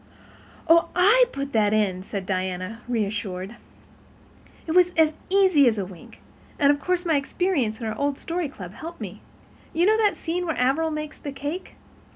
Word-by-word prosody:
"Oh, 335 +1 +5
I 425 +8 +6
put 275 0 -5
that 210 -2 +3
in," 195 -4 +1
said 195 0 -5
Diana, 185 +3 -3
reassured. 205 -2 -3 1.1
"It 320 - -3
was 360 +1 +5
as 315 -1 +4 0.2
easy 370 -8 +5
as 225 -2 +2
wink—and 195 - -3
of 285 - -1
course 360 +4 -1
my 320 -3 +3
experience 280 - -1
in 230 - -5
our 220 0 -3
old 285 +2 -1
Story 335 -2 -3
Club 185 -8 -9
helped 335 +6 -9
me. - - -7 0.5
You 340 +2 +2
know 435 +2 +4
the 425 -2 +2
scene 355 +2 -3
where 325 - -2
Averil 275 +6 +2
makes 305 0 -5
the 285 - -6
cake? 290 +6 -6
285 Hz, 170 wpm, -24 LUFS, 215-340 Hz, 1.1 s, I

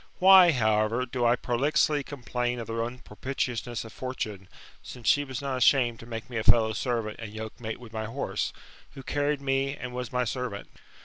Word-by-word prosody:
Why, 185 -2 +8
however, 110 -1 +1
do 120 -1 -2
I 120 - +5
prolixly 145 +4 +1
complain 125 -3 -3
of 115 - -5
the 115 - -6
unpropitiousnesss 120 0 -3
of 110 - -11
Fortune; 105 -7 -5 0.3
since 125 -3 -9
she 145 -2 +5
was 135 -1 -6
not 135 -2 -2
ashamed 125 -2 +3
to 115 - -11
make 115 0 -6
me 120 -3 -5
a 110 - -1
fellow 110 -1 +5
servant 115 -2 -2
and 110 -2 -7
yokemate 110 +1 -6
with 120 -2 -12
my 110 0 -3
horse, 125 +6 -2 0.4
who 135 - -9
carried 145 0 0
me 135 +1 0
and 125 -1 -6
was 125 -2 -4
my 125 0 +1
servant? 125 -4 -4
120 Hz, 185 wpm, -28 LUFS, 115-135 Hz, 0.4 s, Why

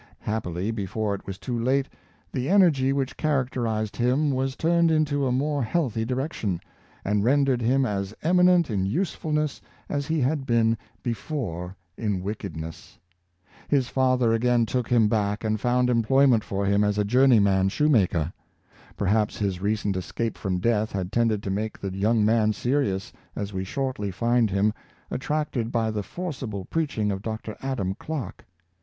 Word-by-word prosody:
Happily, 100 -2 -2
before 105 0 -2
it 100 - -7
was 95 -1 -5
too 120 +4 -3
late, 135 +3 +1 0.4
the 130 +1 -2
energy 165 -9 +4
which 135 -1 -1
characterized 125 -7 -1
him 130 +5 +2
was 130 0 -1
turned 170 +1 +3
into 150 -3 +1
a - - 0
more 145 +3 0
healthy 120 -4 0
direction, 125 - -2 0.5
and 105 0 +1
rendered 135 0 +3
him 130 +3 +2
as 100 -3 -2
eminent 180 -2 +4
in 100 -3 0
usefulness 155 - -1 0.3
as 140 -1 -2
he 160 0 0
had 135 +1 0
been 115 -2 +3 0.3
before 100 - -4 0.2
in 100 -5 -1
wickedness. 85 -6 -6 0.7
His 135 -4 +1
father 130 -3 +2
again 120 0 +3
took 125 +1 -1
him 115 -3 +4
back 105 -1 0
and 110 -1 -1
found 125 0 +2
employment 125 0 +4
for 100 0 -2
him 100 +1 +3
as 105 0 +1
a 105 - +2
journeyman 100 -5 +4
shoemaker. 95 - +2 0.6
Per 100 - -1
haps 105 +2 +1
his 95 -3 -2
recent 105 -1 0
escape 110 +5 -3
from 95 -3 -2
death 110 +2 +1
had 95 -1 -3
tended 115 -3 +1
to 95 - -2
make 110 +3 -2
the 95 -1 -5
young 105 +2 +2
man 110 -1 +3
serious, 105 -5 -1 0.2
as 100 0 -4
we 95 0 -2
shortly 130 -1 -3
find 115 +4 +2
him, 100 +2 +2 0.4
attracted 135 -4 -2
by 115 -2 0
the 105 -1 -2
forcible 130 - -5
preaching 140 -10 -1
of 95 -1 -3
Dr. 110 0 -5
Adam 120 -9 -2
Clarke. 150 +5 -6
115 Hz, 160 wpm, -25 LUFS, 100-135 Hz, 0.7 s, energy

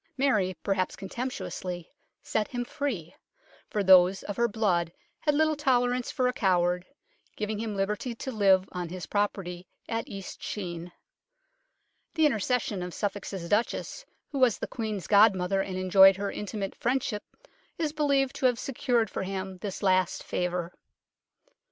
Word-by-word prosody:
Mary, 210 -10 +2
perhaps 195 -2 0
contemptuously, 190 -5 -5 0.4
set 215 -1 0
him 245 -1 -3
free, 225 - -3 0.6
for 210 - 0
those 185 0 +6
of 205 - -4
her 235 0 +2
blood 190 -7 +1 0.3
had 295 -2 +1
little 315 +1 +3
tolerance 250 -3 +1
for 255 -4 +1
a 250 - 0
coward, 180 -4 +1 0.5
giving 210 0 -3
him 220 -2 -3
liberty 210 +5 -2
to 265 - -5
live 195 -4 +4
on 180 -2 -4
his 180 -1 -6
property 190 -3 -2 0.2
at 225 0 -2
East 195 -1 -8
Sheen. 175 -3 -5 1.2
The 320 -1 +4
intercession 225 -5 0
of 180 -1 -5
Suffolk's 205 -1 -3
Duchess, 205 - -1 0.3
who 280 - -2
was 255 -4 +4
the - - -3
Queen's 215 -6 -4
godmother 195 -2 +4
and 185 -1 -4
enjoyed 190 +1 +7
her 200 0 -2
intimate 205 -2 -4
friendship, 240 -4 -1 0.6
is 310 -2 -1
believed 280 -3 +1
to 260 - +4
have 245 -2 +1
secured 245 -3 0
for 185 - -4
him 190 -1 -4
this 200 0 -5
last 185 -1 +2
favour. 180 -1 -2
205 Hz, 145 wpm, -28 LUFS, 185-245 Hz, 1.2 s, enjoyed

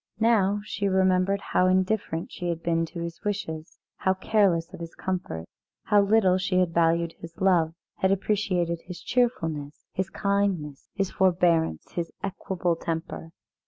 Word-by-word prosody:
Now 205 -3 +3
she 205 -1 -2
remembered 190 +1 +2
how 180 - +4
indifferent 185 -2 0
she 175 -1 -4
had 170 -1 -3
been 165 -1 +1
to 170 - -7
his 170 0 -6
wishes, 160 -6 -4 0.2
how 190 0 +1
careless 190 -4 +2
of 185 - -8
his 165 -1 -8
comforts; 180 - -3 0.4
how 205 -1 +4
little 200 -3 +4
she 185 0 0
had 180 -2 +2
valued 170 0 +2
his 165 0 -11
love, 170 -4 +3 0.2
had 190 - +2
appreciated 185 -4 0
his 180 -2 -7
cheerfulness, 160 - -1
his 190 +1 -2
kindness, 195 -8 -1
his 195 -3 -1
forbearance, 170 - +2
his 170 -1 -3
equable 185 -3 -1
temper. 165 -1 -4
185 Hz, 150 wpm, -26 LUFS, 165-195 Hz, 0.4 s, how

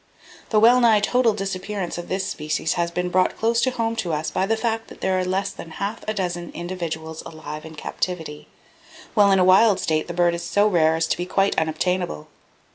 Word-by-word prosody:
The 215 - +3
well 240 +3 +6
nigh 230 -3 +5
total 240 +3 +2
disappearance 195 -1 -4
of 175 - -7
this 190 +1 -1
species 155 0 -2
has 170 0 -1
been 180 +1 -2
brought 185 +1 +1
close 230 +1 +1
home 230 -3 0
to 175 -6 -2
us 155 +1 -2
by 190 - 0
the 225 +1 +1
fact 225 0 -2
that - - -13
there 190 -1 +1
are - - 0
less 190 +2 -1
than 165 - -10
half 200 +3 -4
a 215 - 0
dozen 175 -3 -3
individuals 165 -3 -5
alive 155 -1 -8
in 160 0 -10
captivity, 160 -1 -4 0.7
while 205 -3 +5
in 195 - +5
a 185 - +4
wild 195 +2 +5
state 155 -1 0
the 170 - -6
bird 175 -1 +3
is 170 - -4
so 205 +1 +2
rare 165 -6 +3
as 165 0 +1
to - - -1
be 175 - -4
quite 195 +1 +1
unobtainable. 160 - -2
185 Hz, 210 wpm, -23 LUFS, 165-210 Hz, 0.7 s, well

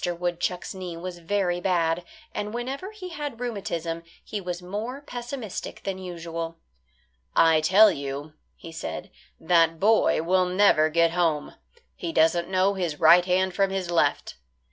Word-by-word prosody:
Woodchuck's 175 0 -2
knee 180 -3 -6
was 175 0 -6
very 175 0 0
bad, 170 -2 +1 0.3
and 210 +2 -4
whenever 265 +10 -4
he 415 -4 -9
had 295 -8 -6
rheumatism 170 -8 -3 0.2
he 210 - -5
was 180 -1 -4
more 210 +9 -5
pessimistic 245 -5 -6
than 195 -1 -3
usual. 165 -2 -5 0.8
"I 160 -1 +5
tell 195 +6 +6
you," 140 +2 -5 0.4
said 165 +3 -6 0.3
he, - - -20
"that 165 -1 +4
boy 210 -5 +3
will 185 +2 +3
never 180 -4 +4
get 165 +1 +3
home. 165 -4 0 0.4
He 335 - -4
doesn't 170 - +2
know 190 +1 +2
his 175 -6 -3
right 170 +2 +7
hand 185 0 +1
from 195 +1 +2
his 190 -2 -3
left." 170 - +1
180 Hz, 145 wpm, -26 LUFS, 165-205 Hz, 0.8 s, right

